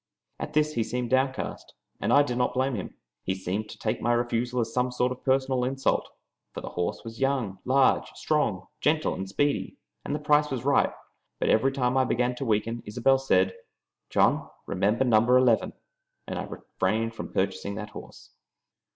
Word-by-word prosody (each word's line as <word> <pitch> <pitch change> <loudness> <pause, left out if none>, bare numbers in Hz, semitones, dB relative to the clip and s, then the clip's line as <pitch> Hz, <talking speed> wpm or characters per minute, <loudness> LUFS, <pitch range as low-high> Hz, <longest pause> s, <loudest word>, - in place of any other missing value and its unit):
At - - -5
this 155 0 +2
he 115 - +1
seemed 120 +2 -3
downcast, 130 0 -1 0.2
and - - 0
I 145 - +7
did 125 -4 -3
not 125 0 0
blame 130 +1 +1
him. 100 -6 -5 0.3
He 95 - -1
seemed 95 +3 -3
to - - -10
take 110 - -2
my 120 - +1
refusal 120 +1 0
as 115 -1 -1
some 125 0 +1
sort 125 0 0
of 125 - -7
personal 130 -1 +2
insult, 135 +1 0 0.5
for - - -4
the - - -6
horse 90 0 -3
was 115 0 -9
young, 130 -8 0
large, 130 +1 +3
strong, 115 -12 0
gentle, 155 +1 +1
and 95 0 -5
speedy, 145 +8 0 0.3
and 145 - -2
the - - -2
price 150 0 +3
was 130 -2 -4
right; 140 - +3 0.5
but - - +1
every 135 +5 +4
time 130 -1 0
I 130 - +5
began 125 +1 +1
to 135 - -3
weaken 115 +1 0
Isobel 125 +5 +3
said, 95 -8 +2 0.6
"John, - - +2 0.2
remember 100 +6 +1
number 120 +1 +5
eleven!" 125 -3 +3 0.5
and - - -4
I - - -3
refrained 115 +1 -2
from - - -7
purchasing 100 +1 -1
that 105 0 -6
horse. - - -12
125 Hz, 185 wpm, -27 LUFS, 110-135 Hz, 0.6 s, I